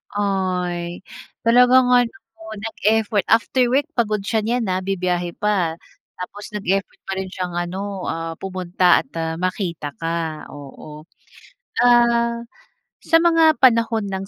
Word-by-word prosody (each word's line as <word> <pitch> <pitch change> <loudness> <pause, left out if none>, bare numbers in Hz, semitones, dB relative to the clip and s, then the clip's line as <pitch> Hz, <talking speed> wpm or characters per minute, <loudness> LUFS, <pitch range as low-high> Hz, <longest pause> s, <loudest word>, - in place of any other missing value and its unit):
Ay, 180 -3 -2 0.4
talagang 250 +2 +5
ano 245 -2 +4 0.5
nag-effort 220 -1 0
after 245 +2 +3
work 285 +4 +2
pagod 215 -6 -1
siya 220 +2 0
nyan 235 +2 0
ha, 185 - 0
bibiyahe 180 -2 -2
pa. 185 -6 0 0.4
Tapos 205 +3 -8
nag-effort 195 -1 -2
pa 195 - -3
rin 190 -1 -5
siyang 180 -1 -5
ano, 185 +2 -4
ah, 165 0 -3
pumunta 185 -1 +2
at, 265 - -31
ah, 160 0 -2
makita 175 -5 -3
ka, 165 -2 -3
oo. 150 +2 -11 0.8
Ah, 235 -1 +3 0.6
sa 330 - 0
mga 330 -2 +4
panahon 230 -3 +4
ng 190 0 -4
195 Hz, 125 wpm, -21 LUFS, 175-235 Hz, 0.8 s, talagang